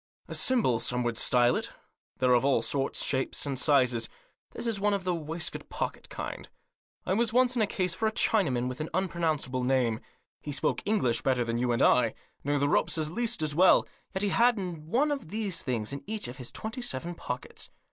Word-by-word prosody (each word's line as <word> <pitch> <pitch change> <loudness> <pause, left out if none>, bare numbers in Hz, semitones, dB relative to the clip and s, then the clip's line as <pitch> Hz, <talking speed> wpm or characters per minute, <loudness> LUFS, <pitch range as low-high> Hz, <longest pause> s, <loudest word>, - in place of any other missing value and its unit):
A - - -7
symbol 225 - +2
some 125 +1 0
would 120 -1 -1
style 120 +2 +4
it. - - -3 0.5
They're 125 -1 +3
of 120 - +4
all 135 -5 +2
sorts, 135 +1 0
shapes 130 +1 0
and 135 -3 -2
sizes; 125 -6 +2 0.4
that - - -6
is 225 -4 0
one 205 0 +2
of 195 - -4
the 180 -1 0
waistcoat 165 +1 -4
pocket - - -4
kind. - - -6 0.6
I 185 - 0
was 225 +2 +2
once 250 0 +4
in 235 - +1
a 215 - +3
case 185 -3 -1
for 220 +5 0
a - - +1
Chinaman 150 - +1
with 125 +3 -5
an 155 - -4
unpronounce 170 -6 0
able 130 0 -2
name. 125 -3 +1 0.4
He 150 - -5
spoke 140 - 0
English 160 - +2
better 130 -2 +1
than 115 0 -2
you 125 0 +1
and 120 - +2
I, 120 -3 +4 0.3
knew 145 +1 +1
the 145 0 +2
ropes 165 +3 +2
at 155 -1 -1
least 235 0 -1
as 150 -1 +1
well, 180 +5 +5 0.2
yet 190 0 -2
he 205 - +2
had 235 +3 +4
one 185 - -1
of 275 - -4
these 205 -3 -2
things 120 -1 -2
in 140 - -6
each 215 - -3
of 125 +2 -9
about 125 - -5
twenty 220 +3 -5
seven 170 - -3
pockets. 125 -6 -6
155 Hz, 215 wpm, -29 LUFS, 125-200 Hz, 0.6 s, well